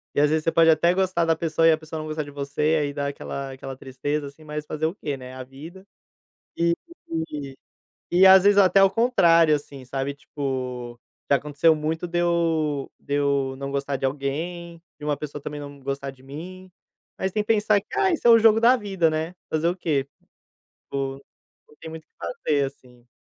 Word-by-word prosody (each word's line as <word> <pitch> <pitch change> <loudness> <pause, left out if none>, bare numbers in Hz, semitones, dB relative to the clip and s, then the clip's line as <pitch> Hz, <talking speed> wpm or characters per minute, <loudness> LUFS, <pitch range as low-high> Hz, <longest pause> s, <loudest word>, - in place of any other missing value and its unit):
E, - - +2
às 150 - +4
vezes, 155 0 +1
você 165 - +1
pode 165 0 +5
até 170 +3 +4
gostar 185 -2 +1
da 165 -1 +2
pessoa 165 0 +1
e 165 - +7
a 155 - +3
pessoa 155 0 -7
não 155 - -6
gostar 155 0 -3
de 145 - -11
você, 145 +2 -1
e - - +3
aí 145 -2 -1
dar 140 -1 -2
aquela 140 -1 -5
aquela 135 0 -8
tristeza, 140 +3 -4
assim, 140 +3 -14
mas 150 0 -5
fazer 155 +1 -3
o 165 +5 -1
quê, 145 -8 -4
né, 130 -1 -10
é 130 - -10
a 130 - -6
vida. 160 +9 -12 0.7
E 170 0 +3 1.4
e 180 +2 +6
às 190 0 +9
vezes 205 0 +5
até 195 -1 +6
ao 195 0 +6
contrário, 170 -10 +4
assim, 140 -2 -8
sabe. 135 +2 -3
Tipo, 130 -4 -5 0.3
já 140 - +5
aconteceu 150 +3 +2
muito 160 +3 -3
de 175 0 -1
eu 165 -4 0
de 140 - -3
eu 140 -2 +1
não 140 0 -5
gostar 140 0 -2
de 135 - -2
alguém, 165 +5 -4 0.2
de 150 - -8
uma 145 -1 0
pessoa 145 0 -7
também 145 +1 -6
não 145 -1 -9
gostar 135 0 -4
de 130 -1 -20
mim. 180 +7 -9 0.5
Mas 190 0 -2
tem 210 +1 0
que - - -27
pensar 215 -2 +3
que: - - -35
"Ah, 380 -2 +3
isso 320 - 0
é - - +8
o 230 - +8
jogo 225 0 +5
da 240 +3 +6
vida, 195 -7 +1
né. 160 +3 -2 0.2
Fazer 160 +1 0
o 175 - +1
quê?" 145 -6 -1 0.8
Vou 135 0 -3 0.5
não 150 - -21
tem 165 - -8
muito 160 0 -9
o - - -62
que - - -57 0.3
fazer, 145 -2 +3
assim. 125 -3 -11
155 Hz, 215 wpm, -24 LUFS, 140-170 Hz, 1.4 s, às